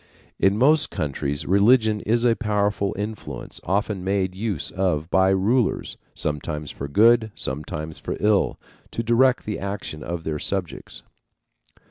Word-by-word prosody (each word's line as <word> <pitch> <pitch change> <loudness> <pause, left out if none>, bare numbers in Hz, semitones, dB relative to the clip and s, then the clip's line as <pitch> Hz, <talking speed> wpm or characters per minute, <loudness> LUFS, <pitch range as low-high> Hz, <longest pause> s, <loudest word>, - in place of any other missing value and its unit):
In 95 +1 +3
most 145 +4 +4
countries 70 0 -3
religion 110 +3 +4
is 115 +3 +1
a 115 -1 +4
powerful 105 -2 0
influence 105 +2 -6
often 100 +1 -1
made 95 -1 0
use 100 -4 -3
of 90 -4 -1
by 95 0 +4
rulers, 100 +5 +1 0.2
sometimes 75 0 -3
for 70 - -6
good, 110 +7 +4
sometimes 75 +3 -5
for - - -4
ill, 105 -1 +2 0.3
to 115 - -3
direct 125 +2 +3
the 105 - -3
action 100 -6 -5
of 85 0 -4
their 75 -1 -3
subjects. 95 -1 -4
100 Hz, 135 wpm, -23 LUFS, 85-110 Hz, 0.3 s, most